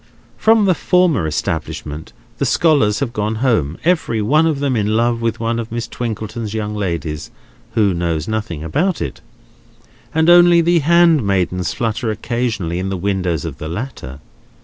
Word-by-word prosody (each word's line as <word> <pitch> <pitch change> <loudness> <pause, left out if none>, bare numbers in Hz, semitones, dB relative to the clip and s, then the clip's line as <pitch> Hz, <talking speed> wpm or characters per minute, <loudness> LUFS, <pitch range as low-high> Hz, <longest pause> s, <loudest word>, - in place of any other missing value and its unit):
From 220 -1 +4
the 185 - +4
former 175 - +2
establishment 75 0 -4 0.3
the - - +1
scholars 140 -10 +2
have 125 -4 -2
gone 105 +1 -1
home, 110 - 0
every 160 -9 +1
one 150 +10 +3
of 155 -4 0
them 140 -2 0
in 110 0 +1
love 120 0 +1
with 115 -1 -1
one 115 +1 -1
of 115 -1 -6
Miss 115 -1 -3
Twinkleton's 110 -1 -5
young 105 -1 -3
ladies 85 -7 -3 0.4
(who 105 -4 +2
knows 85 -2 -2
nothing 110 -8 -3
about 165 - 0
it); 65 - -5 0.9
and 160 +1 +1
only 175 0 +7
the 170 +1 +3
handmaidens 135 - +2
flutter 115 0 -2
occasionally 110 -6 -2
in 95 +1 -3
the 95 - -2
windows 90 -4 -1
of - - -6
the 80 - -5
latter. 85 - -6
110 Hz, 160 wpm, -18 LUFS, 90-140 Hz, 0.9 s, only